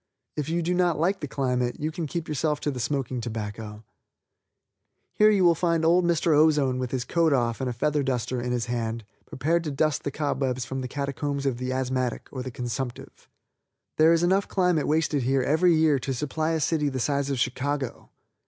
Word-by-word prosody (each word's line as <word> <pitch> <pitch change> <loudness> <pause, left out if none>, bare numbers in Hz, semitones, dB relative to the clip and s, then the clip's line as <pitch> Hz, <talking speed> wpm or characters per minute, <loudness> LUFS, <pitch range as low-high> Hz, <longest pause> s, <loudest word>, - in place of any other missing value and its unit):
If 150 -1 -3
you 170 +1 0
do 175 +2 0
not 175 -3 +2
like 190 +4 +1
the 150 - -4
climate 125 -3 -1
you 155 +2 -2
can 165 -1 -4
keep 165 +2 -4
yourself 150 0 -1
to 145 - -1
the 130 - -6
smoking 130 0 -2
tobacco. 110 -1 -6 1.3
Here 215 0 +5
you 200 -3 +3
will 170 -1 +6
find 165 -1 +1
old 175 +2 +4
Mr. 170 -2 +2
Ozone 145 -4 +3
with 125 -1 -2
his 125 -1 -2
coat 165 +1 +2
off 120 -2 0
and 130 - -1
a - - -1
feather 145 +5 0
duster 125 -2 -1
in 125 0 -3
his 120 -1 -1
hand, 115 -2 -3 0.2
prepared 165 +6 0
to - - -1
dust 150 0 0
the - - -1
cobwebs 135 -3 -1
from 135 +2 -4
the 130 - -4
catacombs 140 +1 -3
of 130 -3 0
the 125 0 -3
asthmatic 130 -2 -2
or 130 - -5
the 130 - -5
consumptive. 120 +1 -6 0.7
There 160 +1 +6
is 170 0 +3
enough 190 +3 +2
climate 180 -5 +1
wasted 155 -2 +1
here 130 +1 +1
every 165 +5 +3
year 155 -3 +3
to 135 +1 -3
supply 155 +4 -1
a 160 - 0
city 150 0 +1
the 130 -1 -4
size 140 +2 0
of 135 -3 -1
Chicago. 130 +1 -2
140 Hz, 205 wpm, -26 LUFS, 125-160 Hz, 1.3 s, will